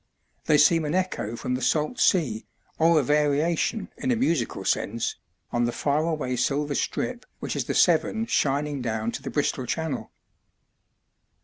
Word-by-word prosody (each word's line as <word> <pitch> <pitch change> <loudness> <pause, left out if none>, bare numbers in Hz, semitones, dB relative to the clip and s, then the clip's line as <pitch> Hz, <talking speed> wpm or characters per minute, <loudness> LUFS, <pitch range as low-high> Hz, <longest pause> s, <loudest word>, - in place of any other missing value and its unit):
They 150 - +4
seem 165 +3 +5
an 150 +3 -1
echo 185 - -1
from 125 - -3
the 125 - -2
salt 155 - 0
sea, 120 - +2 0.3
or 165 0 +5
a - - +1
variation 150 - +1
(in 255 - -3
a 245 - +3
musical 160 - 0
sense) 115 +2 -1 0.3
on 120 0 +1
the 120 - 0
far 145 +4 0
away 150 -6 -2
silver 145 +3 0
strip 245 - -2 0.2
which - - -4
is - - -1
the - - -2
Severn 225 0 +3
shining 145 - 0
down 110 -1 -2
to - - -6
the - - -5
Bristol 140 -3 -1
Channel. 160 -2 -3
150 Hz, 165 wpm, -25 LUFS, 125-165 Hz, 0.3 s, seem